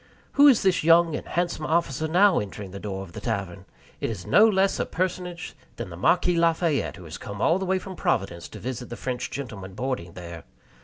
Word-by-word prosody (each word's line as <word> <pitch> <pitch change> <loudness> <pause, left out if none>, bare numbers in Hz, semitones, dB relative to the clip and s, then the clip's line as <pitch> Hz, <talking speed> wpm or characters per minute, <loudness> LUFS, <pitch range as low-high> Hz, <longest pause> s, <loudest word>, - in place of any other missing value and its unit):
Who 285 +1 +6
is 260 -6 +5
this 190 -4 +2
young 165 0 +5
and - - -6
handsome 175 -2 -1
officer 160 -2 0
now 185 +3 +4
entering 100 -1 -6
the 100 - -7
door 95 -2 -5
of 90 - -12
the - - -8
tavern? 100 -5 -3 0.3
It - - -2
is 100 -6 -6
no 220 +2 +6
less 195 -1 +2
a - - +1
personage 180 -1 -3 0.2
than 110 -6 -6
the - - -7
Marquis 175 - +2
Lafayette, 165 - +1
who 90 - -12
has 85 +1 -8
come 100 -1 -7
all 165 - +3
the 190 - -3
way 190 +1 +2
from 185 0 -7
Providence 85 - -1
to - - -10
visit 125 0 -5
the 120 - -6
French 125 -1 -3
gentlemen 105 -9 -7
boarding 120 -9 -3
there. 85 -2 -9
130 Hz, 215 wpm, -25 LUFS, -, 0.3 s, Who